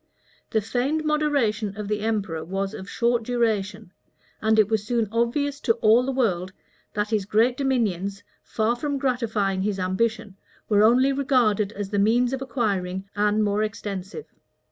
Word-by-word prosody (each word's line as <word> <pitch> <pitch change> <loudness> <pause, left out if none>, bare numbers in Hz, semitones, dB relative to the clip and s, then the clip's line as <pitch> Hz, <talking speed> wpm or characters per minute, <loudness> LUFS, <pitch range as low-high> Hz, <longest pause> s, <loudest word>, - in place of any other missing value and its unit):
The 220 - +1
feigned 260 +8 -1
moderation 255 -9 0
of 210 -1 -5
the 210 0 -1
emperor 205 -7 -2
was 195 +4 -3
of 190 -1 -8
short 240 0 +1
duration; 220 -4 -1 0.5
and 220 0 +2
it 215 -2 +5
was 220 -1 0
soon 230 0 0
obvious 275 +5 0
to 230 - +2
all 225 +1 +4
the 265 +2 -2
world, 185 -8 0 0.4
that 210 +1 -1
his 215 -3 +1
great 225 +5 +2
dominions, 205 -8 -1 0.2
far 225 +2 0
from 285 +3 -2
gratifying 225 -8 0
his 200 0 -1
ambition, 200 +2 -1 0.3
were 205 -1 +3
only 250 +5 +4
regarded 240 -7 +2
as 205 -1 -5
the 205 - +1
means 240 +5 +3
of 265 - -3
acquiring 195 -8 -2
an 210 +1 +2
more 205 0 +1
extensive. 205 - -5
220 Hz, 160 wpm, -24 LUFS, 200-245 Hz, 0.5 s, it